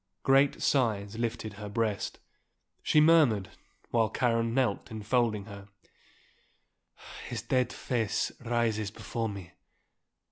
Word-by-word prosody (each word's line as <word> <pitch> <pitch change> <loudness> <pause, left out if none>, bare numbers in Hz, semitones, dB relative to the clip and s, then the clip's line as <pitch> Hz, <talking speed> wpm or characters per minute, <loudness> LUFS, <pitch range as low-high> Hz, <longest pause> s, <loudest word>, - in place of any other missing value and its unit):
Great 135 +1 +3
sighs 110 -5 +1
lifted 115 -2 -3
her 105 0 -8
breast. 110 -2 -2 0.6
She 155 - +3
murmured, 150 - +4 0.4
while 115 -2 +2
Karen 115 -2 +1
knelt 120 -4 0
enfolding 110 -1 0
her, 100 -2 -10 1.6
"His 115 -3 -5
dead 125 +1 +1
face 115 -4 -1
rises 115 -3 0
before 115 +2 -4
me. 100 -4 -8
115 Hz, 105 wpm, -29 LUFS, 105-120 Hz, 1.6 s, murmured